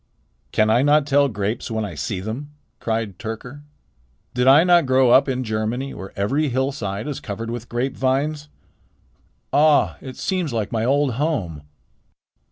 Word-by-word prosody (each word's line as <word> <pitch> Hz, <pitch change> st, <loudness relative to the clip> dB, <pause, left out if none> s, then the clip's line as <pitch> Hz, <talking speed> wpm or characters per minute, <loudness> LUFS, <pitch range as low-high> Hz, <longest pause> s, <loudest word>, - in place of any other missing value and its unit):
"Can 110 Hz, 0 st, +3 dB
I 120 Hz, +3 st, +4 dB
not 145 Hz, +1 st, +4 dB
tell 140 Hz, 0 st, +3 dB
grapes 105 Hz, +1 st, -3 dB
when 110 Hz, -1 st, -2 dB
I 100 Hz, -, -6 dB
see 75 Hz, +6 st, -4 dB
them?" 115 Hz, +9 st, -5 dB, 0.3 s
cried 110 Hz, -4 st, -3 dB
Tyrker. 120 Hz, +5 st, -7 dB, 0.7 s
"Did 125 Hz, +1 st, +1 dB
I 140 Hz, +4 st, +8 dB
not 175 Hz, -4 st, +4 dB
grow 130 Hz, -1 st, +4 dB
up 135 Hz, +2 st, +5 dB
in 130 Hz, -1 st, -1 dB
Germany, 110 Hz, +4 st, -2 dB
where 95 Hz, -, -8 dB
every 140 Hz, +10 st, 0 dB
hillside 120 Hz, -5 st, -2 dB
is 145 Hz, -, -4 dB
covered 115 Hz, +3 st, -5 dB
with 120 Hz, 0 st, -6 dB
grapevines? 135 Hz, +4 st, -1 dB, 1.0 s
Ah! 150 Hz, +1 st, +4 dB
it 130 Hz, -2 st, -9 dB
seems 180 Hz, -6 st, -1 dB
like 110 Hz, -3 st, -2 dB
my 110 Hz, -1 st, -1 dB
old 140 Hz, +1 st, +2 dB
home." 100 Hz, -, -1 dB
125 Hz, 155 wpm, -22 LUFS, 110-145 Hz, 1.0 s, I